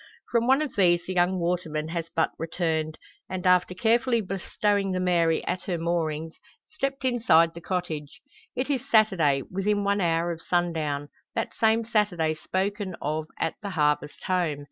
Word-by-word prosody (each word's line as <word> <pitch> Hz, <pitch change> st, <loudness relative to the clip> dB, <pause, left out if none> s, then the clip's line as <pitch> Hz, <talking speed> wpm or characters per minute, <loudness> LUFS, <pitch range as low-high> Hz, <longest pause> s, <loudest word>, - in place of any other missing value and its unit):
From 235 Hz, 0 st, +2 dB
one 270 Hz, +4 st, +4 dB
of 295 Hz, -, -6 dB
these 175 Hz, -4 st, +4 dB
the 185 Hz, -, -3 dB
young 180 Hz, +1 st, +2 dB
waterman 170 Hz, -3 st, -2 dB
has 165 Hz, 0 st, -3 dB
but 160 Hz, -, +2 dB
returned; 160 Hz, -1 st, -1 dB, 0.3 s
and, 185 Hz, 0 st, -4 dB
after 180 Hz, 0 st, +3 dB
carefully 235 Hz, +4 st, +2 dB
bestowing 195 Hz, 0 st, -1 dB
the 185 Hz, -, -1 dB
Mary 170 Hz, -3 st, +2 dB
at 180 Hz, -, -3 dB
her 180 Hz, -3 st, -1 dB
moorings, 165 Hz, -1 st, -2 dB, 0.3 s
stepped 275 Hz, -3 st, -3 dB
inside 170 Hz, -10 st, +4 dB
the 170 Hz, -, -9 dB
cottage. 165 Hz, -5 st, -4 dB, 0.4 s
It 255 Hz, +1 st, -1 dB
is 265 Hz, -4 st, -2 dB
Saturday 170 Hz, -, +4 dB
within 205 Hz, +2 st, 0 dB
one 200 Hz, 0 st, +1 dB
hour 170 Hz, 0 st, +1 dB
of 165 Hz, -1 st, -6 dB
sundown 160 Hz, -5 st, -1 dB, 0.3 s
that 225 Hz, -, -2 dB
same 225 Hz, +1 st, +2 dB
Saturday 205 Hz, -8 st, +1 dB
spoken 190 Hz, +3 st, -2 dB
of 155 Hz, +1 st, -2 dB
"at 165 Hz, -, 0 dB
the 205 Hz, -, -4 dB
Harvest 150 Hz, -4 st, 0 dB
Home." 175 Hz, -6 st, 0 dB
180 Hz, 165 wpm, -26 LUFS, 160-205 Hz, 0.4 s, one